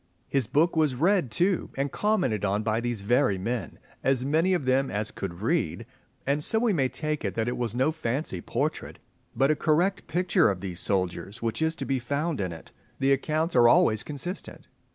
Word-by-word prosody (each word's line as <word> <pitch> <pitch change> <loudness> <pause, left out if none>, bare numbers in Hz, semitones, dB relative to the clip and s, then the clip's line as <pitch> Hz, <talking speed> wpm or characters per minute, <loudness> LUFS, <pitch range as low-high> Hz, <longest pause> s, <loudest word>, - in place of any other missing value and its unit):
His 135 -5 0
book 155 +8 +2
was 155 -5 +2
read 175 +1 +2
too, 175 - +1
and 140 +1 -1
commented 185 - 0
on 105 +1 0
by 110 +1 0
these 120 -3 -2
very 110 -1 +2
men 105 0 -3 0.3
(as 130 -1 +2
many 165 +6 +2
of 150 - -2
them 130 +1 +2
as 105 +1 -2
could 95 0 -6
read), 145 -4 0 0.4
and 145 +2 0
so 220 - +1
we 225 -2 +2
may 135 -6 +1
take 155 +1 -3
it 100 -3 -2
that 115 0 -1
it 120 - -1
was 120 -2 -2
no 130 +5 +2
fancy 130 - -3
portrait, - - -3 0.4
but 135 +5 +3
a - - +2
correct 175 +6 +1
picture 180 - +2
of 95 -3 -2
these 90 -2 -5
soldiers 100 +3 -2
which 115 +4 -2
is 160 0 +2
to - - -5
be 135 -1 0
found 140 +2 -2
in 90 -2 -2
it. 80 -1 -11 0.3
The 135 0 +3
accounts 155 +4 -1
are 120 -1 +7
always 110 -2 +4
consistent. 155 +6 -5
135 Hz, 200 wpm, -27 LUFS, 110-160 Hz, 0.4 s, are